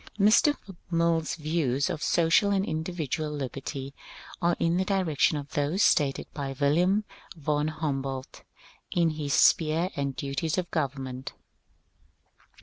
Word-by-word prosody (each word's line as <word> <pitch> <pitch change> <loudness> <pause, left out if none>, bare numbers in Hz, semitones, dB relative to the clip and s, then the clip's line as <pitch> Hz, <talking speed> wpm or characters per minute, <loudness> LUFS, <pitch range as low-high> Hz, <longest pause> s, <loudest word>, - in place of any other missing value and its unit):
Mr. 215 +9 +5 0.3
Mill's 165 -2 +1
views 150 -4 0
of 170 -4 -3
social 170 +6 +3
and 195 -1 +1
individual 160 -1 -3
liberty 135 -1 -5 0.5
are 170 0 +2
in 170 +1 +1
the 190 - +2
direction 185 -6 +1
of 145 -1 -7
those 150 +8 +1
stated 140 -4 +2
by 135 -2 -4
Wilhelm 175 +9 +3 0.3
von 150 0 0
Humboldt 135 -4 -4 0.5
in 170 -2 +2
his 150 -2 -3
^^ - - +4
Sphere 165 +3 +3
and 140 -1 -2
Duties 140 +4 -2
of 180 -1 -2
Government." 135 -4 -3
155 Hz, 130 wpm, -27 LUFS, 140-170 Hz, 0.5 s, Mr